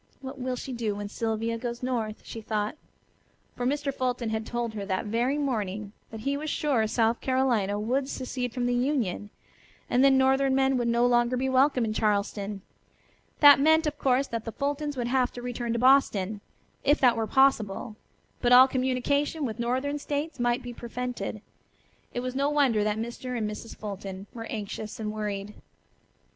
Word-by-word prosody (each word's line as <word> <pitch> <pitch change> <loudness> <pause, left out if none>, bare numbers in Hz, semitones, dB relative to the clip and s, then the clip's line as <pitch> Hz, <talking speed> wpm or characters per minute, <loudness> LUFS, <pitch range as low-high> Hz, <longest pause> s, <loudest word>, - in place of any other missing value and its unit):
What 265 0 -8
will 255 0 -2
she 255 +1 -6
do 225 -4 -2
when 205 0 -5
Sylvia 225 +1 -2
goes 240 +1 -5
north?" 230 -4 -2
she 225 - -8
thought. 210 +2 -2 0.8
For 245 - -1
Mr. 285 0 -1
Fulton 250 -3 -1
had 220 0 -3
told 240 -2 -2
her 205 -2 -4
that 190 +1 -2
very 240 +6 0
morning 210 -7 -2 0.2
that 220 -1 -8
he 275 +4 -1
was 305 +2 -4
sure 270 -8 +1
South 225 +1 +1
Carolina 240 -7 +1
would 260 +5 -1
secede 250 -2 -3
from 245 0 -2
the 245 - +1
Union, 245 -6 -1 0.6
and 250 +2 +4
then 270 -1 +6
northern 265 0 +3
men 265 0 +3
would 240 -1 0
no 235 +1 +3
longer 240 0 +3
be 265 +1 0
welcome 260 -1 +3
in 215 - -2
Charleston. 205 -2 -1 0.8
That 290 -1 +9
meant 315 +3 +4
of 295 -1 -2
course 265 0 +2
that 230 -4 -4
the 225 - -5
Fultons 290 0 -2
would 245 - -1
have 255 0 +1
to 245 - -7
return 240 -1 -3
to - - 0
Boston, 220 -6 +3 0.4
if 290 +2 +3
that 245 -3 +5
were 225 -1 -1
possible, 230 -5 +2 0.5
but 245 - +2
all 255 +1 +9
communication 270 +4 0
with 225 -2 -5
northern 260 +5 -1
states 290 0 -3
might 240 +1 +1
be 245 0 -6
prevented. 235 -3 -5 0.7
It 245 - -3
was 255 0 -3
no 280 +2 +1
wonder 270 -8 +3
that 210 0 0
Mr. 240 +2 -4
and 215 -2 -1
Mrs. 210 +2 -7
Fulton 195 -2 -7
were 225 -1 -6
anxious 215 +1 -6
and 210 -1 -3
worried. 210 -1 -4
245 Hz, 180 wpm, -27 LUFS, 220-265 Hz, 0.8 s, That